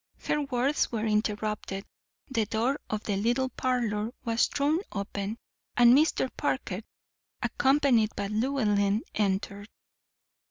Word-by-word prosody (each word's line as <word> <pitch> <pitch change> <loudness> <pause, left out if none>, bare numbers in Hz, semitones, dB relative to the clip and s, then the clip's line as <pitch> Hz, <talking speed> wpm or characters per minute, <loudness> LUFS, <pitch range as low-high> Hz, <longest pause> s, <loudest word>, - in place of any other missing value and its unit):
Her 300 - 0
words 275 +1 0
were 225 -2 -1
interrupted, 210 -2 -1 0.4
the 230 -6 0
door 235 +7 0
of 215 0 -2
the 200 -2 -1
little 240 +5 +1
parlor 235 -4 -1
was 230 0 +2
thrown 295 +3 +1
open, 200 +1 -4 0.4
and 240 0 +8
Mr. 300 -2 +3
Parker, 220 -9 -2 0.6
accompanied 265 -5 +3
by 200 - -2
Llewellyn, 215 -2 +1
entered. 200 0 -1
225 Hz, 115 wpm, -28 LUFS, 210-260 Hz, 0.6 s, and